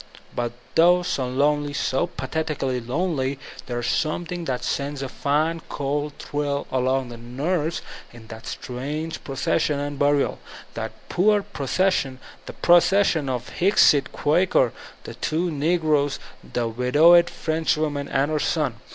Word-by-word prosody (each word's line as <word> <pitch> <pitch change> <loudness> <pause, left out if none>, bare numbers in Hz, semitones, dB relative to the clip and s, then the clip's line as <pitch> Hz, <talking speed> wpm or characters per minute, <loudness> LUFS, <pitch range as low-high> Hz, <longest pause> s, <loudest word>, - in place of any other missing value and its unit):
But 120 -1 -2 0.2
though 175 +2 +5
so 135 -7 -1
lonely, 145 +3 +1
so 135 -1 0
pathetically 135 -1 -2
lonely, 135 +1 -1 0.3
there 120 -1 -3
is - - -4
scmiething 170 +4 -1
that 125 -2 -2
sends 140 0 -2
a - - -3
fine, 155 +5 0
cold 145 +1 -2
thrill 145 -1 -2
along 130 0 0
the 120 - -8
nerves 150 +8 -2 0.3
in 120 -1 -13
that 110 0 -9
strange 145 +6 -5
procession 150 +2 0
and 145 0 -4
burial 145 0 +2 0.2
— - - -18
^that - - -3 0.2
poor 205 +2 +3
procession, 170 -5 0 0.3
that - - -11
pro 175 0 +8
cession 175 -6 +2
of 125 -2 -2
the - - -12
Hicksite 160 -7 +4
Quaker, 150 -5 +2 0.3
the - - -8
two 170 +3 -1
negroes, 150 -2 +1 0.2
the 120 -1 -3
wid 125 +4 -2
owed 170 +2 +7
Frenchwoman 155 -3 -1
and 140 +3 0
her 155 - +1
son. 145 -7 0
145 Hz, 145 wpm, -24 LUFS, 130-165 Hz, 0.3 s, pro